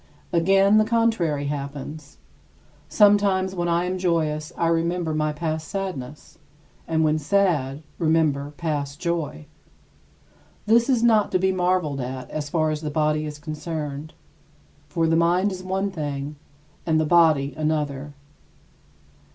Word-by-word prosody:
Again, 195 +4 +4
the - - +5
contrary 215 -11 +1
happens. 145 +1 -6 0.7
Sometimes 200 -3 +4
when 175 -2 -2
I 170 +1 +1
am 185 +1 -2
joyous 155 -4 0
I 170 - +1
remember 165 0 0
my 155 0 0
past 155 0 -3
sadness, 150 -9 -6 0.5
and 160 -1 +1
when 155 0 +2
sad, 155 -5 +1 0.2
remember 155 -3 +1
past 145 -3 -3
joy. 165 - -3 1.2
This 230 +4 +4
is 245 -3 +2
not 220 -3 +4
to - - +5
be 190 +1 +2
marveled 180 -6 0
at 125 0 -6
as 150 -1 -4
far 155 0 +1
as 155 0 -3
the 155 - -3
body 155 0 0
is 150 0 -7
concerned; 155 -1 -6 0.7
for 165 +2 0
the 160 0 +2
mind 175 +4 +2
is 185 -1 -6
one 190 +2 -2
thing 145 -3 -4 0.5
and 160 -2 +1
the 155 - +1
body 155 -4 +4
another. 150 -2 -2
160 Hz, 135 wpm, -24 LUFS, 150-185 Hz, 1.2 s, the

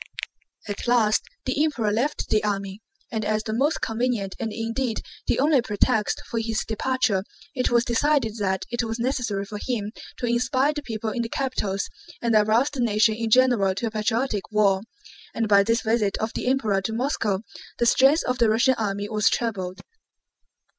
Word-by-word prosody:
At 205 +3 -5
last 225 -3 +3 0.2
the 270 +3 +1
Emperor 245 -9 0
left 255 +8 -1
the 215 - +2
army, 200 0 -3 0.3
and 220 -1 -2
as 215 +1 0
the 220 - -3
most 280 +7 +1
convenient 225 -4 -1
and 225 - -2
indeed 230 +2 -2 0.2
the - - +2
only 285 -1 +4
pretext 210 -2 0
for 230 - -3
his 225 -1 -2
departure 225 -3 0 0.3
it 255 -3 0
was 240 0 +3
decided 240 -2 +1
that 190 -2 -1
it 240 - 0
was 225 -1 -3
necessary 235 -5 -1
for 210 0 -7
him 215 -5 -2 0.3
to - - -3
inspire 255 +4 +1
the 295 - -4
people 225 -4 -4
in 240 - -2
the 230 - -3
capitals 210 -8 -2 0.3
and 235 -1 0
arouse 220 +6 +3
the 280 - -7
nation 220 -2 +3
in 225 +1 -3
general 230 -6 +4
to 215 - -2
a 225 - -2
patriotic 215 0 -1
war. 200 -3 +3 0.5
And 225 -1 0
by 200 -1 +6
this 230 +4 +1
visit 220 -3 +1
of 220 +1 -3
the - - -4
Emperor 220 -7 +1
to 220 +3 -3
Moscow 225 -5 -1 0.3
the 235 - +1
strength 270 +6 +5
of 250 0 -2
the 230 - +4
Russian 230 +4 +4
army 205 -1 -2
was 210 -1 +2
trebled. 190 -6 -2
225 Hz, 180 wpm, -24 LUFS, 210-250 Hz, 0.5 s, by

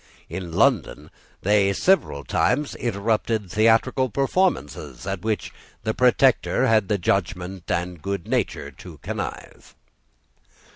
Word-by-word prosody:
In 90 -3 -6
London 95 - +1 0.3
they 100 0 +3
several 100 - +2
times 140 - 0
interrupted 110 -2 -1
theatrical 115 +4 +3
performances 100 - -1
at 95 -2 -3
which 110 0 -2 0.3
the - - -1
Protector - - +3
had 110 -3 +3
the 105 - +1
judgment 90 0 -2
and 90 -1 -2
good 100 -1 -4
nature - - -1
to - - -12
connive. - - -6
100 Hz, 110 wpm, -23 LUFS, 90-115 Hz, 0.3 s, they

